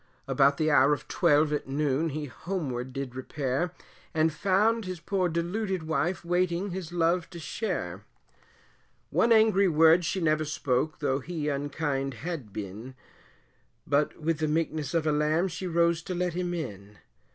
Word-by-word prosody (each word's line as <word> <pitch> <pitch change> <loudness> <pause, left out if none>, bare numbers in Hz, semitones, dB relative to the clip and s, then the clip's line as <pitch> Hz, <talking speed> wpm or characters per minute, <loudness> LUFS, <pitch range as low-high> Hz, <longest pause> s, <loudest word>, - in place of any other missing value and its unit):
About 140 0 +3
the 155 0 +2
hour 140 +1 +5
of 145 - -5
twelve 150 +1 +3
at 150 - -2
noon, 145 +2 0
he 150 0 -4
homeward 130 -4 -4
did 135 -1 -5
repair, 135 +5 -2 0.4
And 160 0 +3
found 205 +7 +2
his 185 -2 -5
poor 185 +1 0
deluded 180 +2 -2
wife, 170 +3 -1
waiting 180 +2 0
his 180 -2 -5
love 170 0 +1
to 175 - -10
share 190 +7 -4 1.1
One 235 - +3
angry 220 -3 +5
word 165 +1 +5
she 190 +4 -1
never 155 -2 +2
spoke, 150 -1 -1
though 135 -2 +1
he 155 +1 -3
unkind 140 -1 -2
had 155 - -5
been 105 +6 -7 0.9
But 145 +3 +1
with 160 0 -1
the 155 - +1
meekness 155 -2 -1
of 165 -2 +1
a 155 - +3
lamb, 155 +4 +2
she 175 +2 -5
rose 170 -1 +2
to 180 +2 -5
let 175 -1 -1
him 175 0 -2
in. 105 - -7
160 Hz, 160 wpm, -28 LUFS, 140-175 Hz, 1.1 s, hour